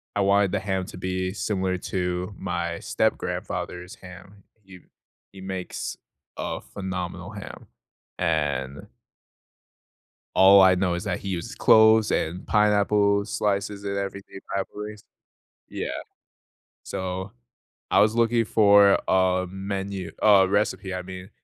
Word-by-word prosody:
I 100 - +1
wanted 100 -1 +3
the - - 0
ham 95 -2 -2
to - - -10
be 95 0 -2
similar 95 -3 -1
to 90 +1 -3
my 85 0 -3
step-grandfather's 90 0 -3
ham, 95 +2 -14 0.2
he 95 -1 -14 0.5
he 95 - -12
makes 95 -1 -5 0.4
a - - -4
phenomenal 90 -1 -6
ham, 105 -2 -10 0.5
and 70 -5 -1 1.5
all 95 +1 +8
I 95 -1 +6
know 90 -1 0
is 90 +4 -3
that 95 -3 -2
he 100 - -6
uses 90 -3 -4
cloves 110 0 +5
and 85 +3 -2
pineapple 105 -1 +3
slices 100 -1 -2
and 100 0 -3
everything 100 0 -6 0.2
I 100 - +1
believe. 105 0 -7 0.7
Yeah. - - -4 1.0
So, 95 +2 -5 0.6
I - - +5
was 110 +1 +4
looking 115 0 +3
for 100 -2 +5
a 95 0 +2
menu 95 -1 -5
a 100 -3 +6
recipe, 100 -1 -1
I 90 - -4
mean, 95 +1 -9
95 Hz, 125 wpm, -25 LUFS, 90-100 Hz, 1.5 s, all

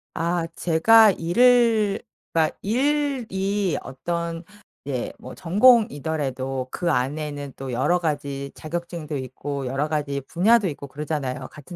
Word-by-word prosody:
아 170 +1 -1
제가 215 +6 +5
일을 220 +3 +3 0.3
그니까 160 -1 +1
일이 220 - 0
어떤 170 +4 -4 0.4
이제 130 -4 -3
뭐 130 - -9
전공이더라도 155 - +2
그 175 -2 -1
안에는 145 +1 -2
또 135 -1 -6
여러 130 +9 +1
가지 140 -4 -3
자격증도 165 -2 -5
있고 135 +1 -5
여러 135 +4 -1
가지 145 -2 -2
분야도 210 +4 +3
있고 140 -2 -7
그러잖아요 145 -2 -4
같은 155 +4 -11
160 Hz, 265 characters per minute, -23 LUFS, 140-195 Hz, 0.4 s, 제가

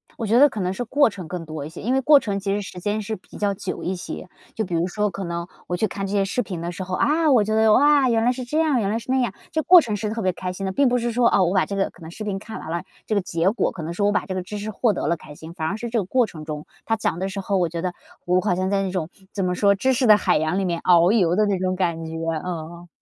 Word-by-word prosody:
我 230 - -4
觉 225 +3 +4
得 290 +2 +7
可 220 - -6
能 180 0 -1
是 220 - -3
过 280 +3 +3
程 190 -5 -8
更 170 0 -5
多 155 -2 -6
一 - - -7
些， 160 - -10
因 245 +5 0
为 265 - +2
过 290 +2 +7
程 200 -6 -3
其 195 0 -2
实 205 - -1
时 185 -2 -8
间 205 +4 -1
是 220 +1 -4
比 185 - -14
较 205 -1 0
久 195 -1 -5
一 185 - -1
些， 180 - -7 0.3
就 220 - -1
比 180 - -6
如 170 +1 +1
说 210 +3 -1
可 195 +2 -5
能 170 0 -4 0.2
我 175 - -1
去 220 - +1
看 195 0 -4
这 195 - -5
些 200 -1 +3
视 195 +6 -1
频 185 -8 -5
的 170 +1 -3
时 180 +2 -6
候， 185 0 -3
啊， 310 - +2
我 240 -5 +5
觉 215 +1 -2
得， 220 0 +4
哇， 285 -1 +5
原 225 -1 +2
来 245 - +4
是 255 0 -5
这 300 +6 -1
样， 305 -6 +2
原 200 -3 0
来 220 - 0
是 235 +3 -5
那 265 - +3
样。 240 -6 0 0.2
这 315 - 0
个 - - -14
过 365 0 +9
程 220 -7 -3
是 210 +1 -3
特 225 +1 -3
别 185 -2 +1
开 180 +1 -4
心 195 +1 -5
的， 190 - -1
并 275 +8 +3
不 245 - +2
是 240 0 -1
说， 240 0 +3
哦， 190 - +3
我 175 +2 +1
把 190 - +3
这 200 - -5
个 195 0 0
可 175 - -20
能 160 - -9
视 215 - -8
频 200 -2 -3
看 220 +2 -8
完 160 - -7
了， 170 +1 -2 0.2
这 - - -2
个 200 - +2
结 175 +1 0
果 235 - 0
可 170 - -7
能 165 +2 -4
说 205 +3 +1
我 205 - +3
把 - - 0
这 190 - -4
个 185 - -2
知 200 +4 -7
识 210 +1 -4
获 225 +2 +1
得 - - -3
了 170 +1 +1
开 150 -1 -12
心， 160 +2 -10
反 160 -2 -3
而 200 - -2
是 235 +1 -5
这 230 -1 0
个 195 - -2
过 250 +6 +2
程 155 -7 -10
中 150 -1 -6 0.2
它 225 - +1
讲 210 -6 -2
得 190 +1 -2
时 195 +1 -5
候 195 0 0
我 175 -2 +1
觉 165 0 -4
得 180 -1 -2 0.3
我 180 +1 +3
好 190 -3 +1
像 185 +1 -1
在 200 -1 +2
那 190 - -2
种 175 -4 -3 0.2
怎 195 -3 -1
么 180 - 0
说， 200 +2 +3
知 260 +7 +1
识 250 0 +1
的 215 -1 +8
海 185 -5 +2
洋 155 +4 0
里 195 - 0
面 170 -2 -1
遨 175 0 +5
游 180 -6 +3
的 215 +2 +3
那 200 -3 0
种 185 0 0
感 170 -3 -1
觉， 160 - -7 0.3
嗯。 170 0 -6
195 Hz, 370 characters per minute, -23 LUFS, 180-220 Hz, 0.3 s, 过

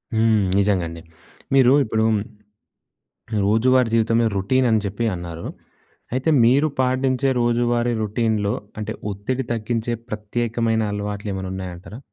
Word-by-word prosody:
హ్మ్. 110 -2 +3
నిజంగా 100 -3 +2
అండి. 85 0 -9 0.5
మీరు 130 -1 +6
ఇప్పుడు 110 -1 0 1.4
రోజువారీ 120 +4 +3
జీవితంలో 115 +1 +3
రొటీన్ 130 +7 +2
అని 110 - +3
చెప్పి 100 +4 -3
అన్నారు. 85 -1 -7 0.7
అయితే 130 +5 +1
మీరు 135 +6 +4
పాటించే 130 +1 +1
రోజువారీ 120 0 +1
రొటీన్‌లో 105 -1 0 0.3
అంటే, 105 +1 -3 0.2
ఒత్తిడి 125 +7 -3
తగ్గించే 115 +1 -2 0.2
ప్రత్యేకమైన 115 +1 -1
అలవాట్లేమైనా 100 -2 -4
ఉన్నాయంటారా? 95 +3 -7
110 Hz, 110 wpm, -22 LUFS, 100-120 Hz, 1.4 s, మీరు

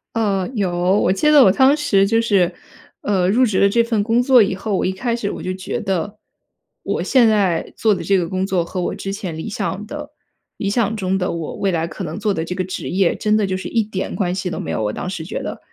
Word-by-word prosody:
呃， 200 -5 0
有。 195 -4 0 0.3
我 185 - +2
记 250 +11 +2
得 295 -3 +7
我 190 - +6
当 265 +7 +4
时 215 -10 +2
就 225 +2 +2
是， 195 -6 +2 0.5
呃， 190 -3 +1
入 250 +5 +4
职 210 -5 0
了 200 - +5
这 235 +3 +3
份 230 -3 0
工 225 +3 +2
作 255 -2 +6
以 195 -2 +1
后， 205 +2 -4
我 - - 0
一 185 - +1
开 235 +5 -2
始 225 -4 -2
我 - - -6
就 185 - -2
觉 185 0 -4
得， 195 +1 -2 0.7
我 - - -2
现 250 -4 +4
在 195 -6 +1
做 220 -2 +2
的 - - -3
这 195 -1 +2
个 175 - -1
工 190 0 -1
作 185 -3 +1
和 175 +2 -5
我 - - -2
之 195 - -5
前 185 -5 -5
理 160 - -5
想 205 0 -3
的 295 +5 -7 0.5
理 200 - -2
想 220 0 0
中 190 -2 -1
的 180 - -1
我 165 -2 -5
未 195 - -1
来 165 -3 0
可 180 +2 -6
能 155 +4 -5
做 210 -1 0
的 160 -3 -3
这 180 - -4
个 185 - -1
职 185 +1 -5
业， 185 -1 +2
真 215 -1 0
的 215 - +2
就 190 -1 -2
是 185 - -6
一 230 -2 +1
点 205 -2 -4
关 180 -4 -1
系 185 -1 -3
都 - - -5
没 80 - -4
有， 80 - -2
我 105 - 0
当 - - -4
时 175 -4 -5
觉 - - -5
得。 - - -5
195 Hz, 285 characters per minute, -20 LUFS, 185-220 Hz, 0.7 s, 得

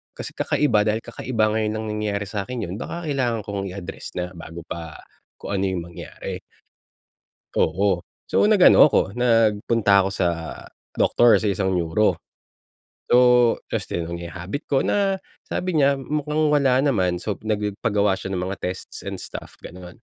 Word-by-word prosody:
kasi - - -6
kakaiba 110 -8 +1
dahil 110 +1 0
kakaiba 115 -2 -1
ngayon 110 -1 0
lang 110 0 -4
nangyari 100 -1 -1
sa'kin 105 +4 -4
yun 90 - -5
baka 170 0 -5
kailangan 125 -6 0
kong 100 -1 -4
i-address 95 -1 -7
na 90 - -1
bago 85 0 -9
pa 80 -2 -7 0.4
kung - - -7
ano - - 0
yung 90 -2 -2
mangyari. 85 - -7 1.1
Oo. 95 +2 +1 0.2
So, - - +2
nag-ano 185 -7 +7
ako, 100 - +1
nagpunta 115 -3 +3
ako 95 - -1
sa 95 -2 0 0.7
doctor, 120 -1 +5
sa 110 - -2
isang 95 -1 0
neuro. 85 +5 +1 0.9
So 125 -1 +5 0.2
tapos - - -2
tinanong 85 0 -4
niya 85 - -6
yung 85 - -11
habit 95 - -5
ko 135 -2 +2
na 195 -1 +1 0.3
sabi 185 0 -2
niya 140 -3 +3
mukhang 150 +2 -1
wala 135 -4 +4
naman. 95 -10 +1
So 100 +3 -4
nagpagawa 105 -1 0
siya 95 - -4
ng 90 - -2
mga 95 +1 -5
tests 90 +1 -5
and - - -5
stuff - - -9
gano'n. 90 0 -10
105 Hz, 160 wpm, -23 LUFS, 95-125 Hz, 1.1 s, nag-ano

